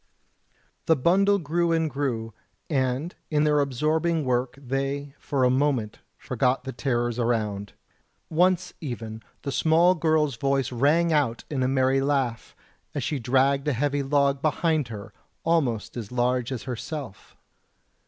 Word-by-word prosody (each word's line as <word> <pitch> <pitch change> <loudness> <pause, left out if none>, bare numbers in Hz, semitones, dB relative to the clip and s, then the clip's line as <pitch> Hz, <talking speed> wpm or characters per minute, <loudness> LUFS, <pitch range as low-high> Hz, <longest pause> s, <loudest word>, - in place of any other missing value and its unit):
The 160 - +5
bundle 195 +8 +3
grew 170 0 0
and 165 -1 +2
grew, 125 -6 -3 0.4
and 130 +4 0 0.2
in 150 -1 +2
their 150 -1 +3
absorbing 155 +4 0
work 125 0 0
they 135 +1 -3
for 135 -3 -1
a 125 - +4
moment 130 -5 0 0.2
forgot 125 +1 0
the 130 - -5
terrors 120 -2 -1
around; 105 -4 -1 0.5
once 180 +2 +2
even 115 -6 -6 0.2
the 140 - -3
small 165 +5 +4
girl's 155 -5 +1
voice 135 -2 0
rang 155 +7 +3
out 135 -6 +1
in 135 -3 -1
a 130 - +2
merry 130 0 +2
laugh, 135 -5 -1 0.4
as 145 - -1
she 145 +2 -1
dragged 135 +3 +2
a 150 - +2
heavy 145 +3 0
log 140 0 +1
behind 155 -2 +1
her, 105 -3 -8 0.3
almost 140 -10 0
as 115 -3 -6
large 125 0 0
as 125 -4 -4
herself. 125 -1 -7
135 Hz, 145 wpm, -25 LUFS, 125-155 Hz, 0.5 s, The